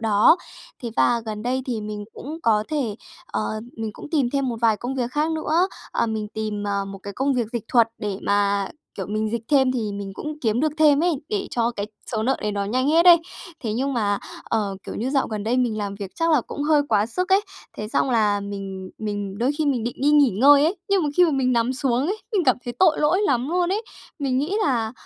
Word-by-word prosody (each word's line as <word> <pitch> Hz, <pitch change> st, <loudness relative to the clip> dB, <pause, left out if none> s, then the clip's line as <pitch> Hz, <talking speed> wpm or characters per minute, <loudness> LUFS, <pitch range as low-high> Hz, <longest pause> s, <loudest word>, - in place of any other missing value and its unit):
đó. 220 Hz, -, +5 dB, 0.5 s
Thế 235 Hz, -, -3 dB
và 235 Hz, -1 st, +3 dB
gần 215 Hz, -1 st, -4 dB
đây 260 Hz, +2 st, -1 dB
thì 235 Hz, -4 st, -2 dB
mình 210 Hz, 0 st, -5 dB
cũng 305 Hz, +5 st, -7 dB
có 215 Hz, -2 st, +3 dB
thể, 270 Hz, -9 st, -1 dB, 0.3 s
ờ, -, -, -3 dB, 0.4 s
mình 220 Hz, -1 st, -3 dB
cũng -, -, -11 dB
tìm 275 Hz, -7 st, +1 dB
thêm 275 Hz, -2 st, 0 dB
một 235 Hz, -, -2 dB
vài 225 Hz, -2 st, +3 dB
công 250 Hz, +4 st, -4 dB
việc 250 Hz, -2 st, -2 dB
khác 300 Hz, +3 st, 0 dB
nữa. 320 Hz, +3 st, +1 dB, 0.2 s
Ờ, -, -, 0 dB
mình 215 Hz, -1 st, -3 dB
tìm, 215 Hz, -1 st, -4 dB
ờ, 200 Hz, -1 st, -1 dB
một 195 Hz, 0 st, -8 dB
cái 200 Hz, +1 st, -8 dB
công 270 Hz, +3 st, 0 dB
việc 240 Hz, -3 st, 0 dB
dịch 235 Hz, -3 st, -3 dB
thuật 235 Hz, -3 st, +4 dB
để 205 Hz, -2 st, -3 dB
mà, 200 Hz, -1 st, +1 dB, 0.3 s
kiểu, 190 Hz, -, -5 dB
mình 215 Hz, +1 st, -1 dB
dịch 235 Hz, 0 st, -2 dB
thêm 265 Hz, -3 st, +4 dB
thì 220 Hz, -5 st, -2 dB
mình 200 Hz, -1 st, -5 dB
cũng 300 Hz, +7 st, -6 dB
kiếm 230 Hz, +1 st, +1 dB
được 305 Hz, -1 st, +1 dB
thêm 300 Hz, -1 st, +5 dB
ấy, 340 Hz, -6 st, +1 dB
để 415 Hz, -3 st, -2 dB
cho 235 Hz, 0 st, +1 dB
cái 205 Hz, 0 st, -2 dB, 0.3 s
số 220 Hz, -1 st, 0 dB
nợ 265 Hz, +3 st, +1 dB
đấy 210 Hz, -1 st, -1 dB
nó 200 Hz, 0 st, -1 dB
nhanh 255 Hz, +7 st, 0 dB
hết 330 Hz, +3 st, +4 dB
ấy. 350 Hz, -1 st, +10 dB, 0.4 s
Thế 220 Hz, -4 st, -2 dB
nhưng 270 Hz, +5 st, -1 dB
mà, 205 Hz, -4 st, +1 dB, 0.3 s
ờ, 205 Hz, -3 st, -1 dB
kiểu -, -, -5 dB
như 250 Hz, +4 st, -2 dB
dạo 275 Hz, -2 st, +1 dB
gần 215 Hz, -2 st, -4 dB
đây 240 Hz, +3 st, +1 dB
mình 240 Hz, -4 st, +1 dB
làm 200 Hz, -1 st, -3 dB
việc 200 Hz, -2 st, -7 dB
chắc 330 Hz, 0 st, +1 dB
là 305 Hz, -, +5 dB
cũng 285 Hz, -, -6 dB
hơi 300 Hz, -1 st, +4 dB
quá 210 Hz, -1 st, +3 dB
sức 360 Hz, +10 st, -2 dB
ấy. 385 Hz, +1 st, +5 dB, 0.4 s
Thế 210 Hz, -, -5 dB
xong 260 Hz, -, +1 dB
là 210 Hz, -4 st, +2 dB
mình 195 Hz, -2 st, -6 dB
mình 205 Hz, -2 st, -4 dB
đôi 245 Hz, +3 st, +2 dB
khi 310 Hz, -, +1 dB
mình 250 Hz, -5 st, 0 dB
định 240 Hz, -, -3 dB
đi 285 Hz, +2 st, +3 dB
nghỉ 290 Hz, -3 st, +5 dB
ngơi 280 Hz, +8 st, +6 dB
ấy, 340 Hz, +6 st, +1 dB
nhưng 395 Hz, -3 st, +3 dB
mà 300 Hz, -, 0 dB
khi 360 Hz, -, +7 dB
mà 330 Hz, -, +2 dB
mình 260 Hz, -2 st, +1 dB
nằm 235 Hz, +1 st, +1 dB
xuống 260 Hz, +1 st, 0 dB
ấy 405 Hz, +4 st, -1 dB, 0.2 s
thì 415 Hz, -, +2 dB
mình 350 Hz, -, +1 dB
cảm 255 Hz, -, +4 dB
thấy 240 Hz, -, -4 dB
tội 360 Hz, -4 st, +4 dB
lỗi 350 Hz, +6 st, +3 dB
lắm 265 Hz, -, +1 dB
luôn 355 Hz, +1 st, +1 dB
ấy. 420 Hz, +3 st, -1 dB, 0.4 s
Mình 265 Hz, -3 st, 0 dB
nghĩ 325 Hz, +9 st, -1 dB
là, 230 Hz, -5 st, 0 dB
240 Hz, 255 wpm, -23 LUFS, 210-290 Hz, 0.5 s, ấy